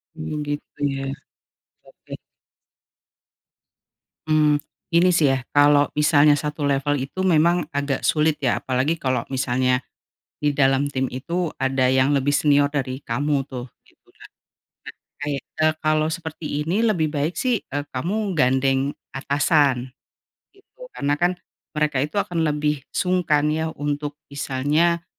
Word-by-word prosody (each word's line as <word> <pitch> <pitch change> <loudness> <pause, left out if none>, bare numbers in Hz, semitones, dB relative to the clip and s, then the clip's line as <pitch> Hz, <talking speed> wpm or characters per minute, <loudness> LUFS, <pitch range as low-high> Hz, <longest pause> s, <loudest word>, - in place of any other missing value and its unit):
Hmm, 80 - -5
gitu 145 0 -6
ya? 135 - -4 0.9
Oke. - - -14 2.1
Mmm, 150 -1 +3 0.3
ini 170 +2 +4
sih 145 -5 +4
ya, 135 - +1 0.2
kalau 145 0 +5
misalnya 150 0 +5
satu 150 0 -3
level 140 +1 +1
itu 135 +8 -4
memang 175 0 +3
agak 140 -1 -2
sulit 155 0 +2
ya 125 -4 +1
apalagi 135 +6 0
kalo 130 -2 0
misalnya, 130 -1 +1 0.6
di 150 - +2
dalam 135 0 +3
tim 130 -1 -1
itu 165 +6 -3
ada 135 -1 +1
yang 130 +2 +3
lebih 140 +1 0
senior 145 -1 +4
dari 130 -3 -2
kamu 140 +3 0
tuh. 130 -2 -7 0.2
Gitu - - -28
kan? - - -16 0.7
Nah, - - -70
kae 145 -1 -2
eee, 155 0 0
kalau 155 0 +2
seperti 160 -2 -4
ini 180 +8 0
lebih 175 -9 +1
baik 150 +4 -1
sih, 250 -5 0
eee, 145 +1 -5
kamu 195 +10 -2
gandeng 135 -1 +1 0.2
atasan. 140 -2 +1 0.6
Gitu. 395 +5 -28 0.2
Karena 145 +1 0
kan 175 +1 +2 0.4
mereka 150 -3 +1
itu 150 +7 -3
akan 170 -5 0
lebih 150 -1 0
sungkan 160 -5 +1
ya 160 +1 -1
untuk 145 0 -3 0.2
misalnya, 150 +5 0
145 Hz, 135 wpm, -22 LUFS, 135-160 Hz, 2.1 s, kalau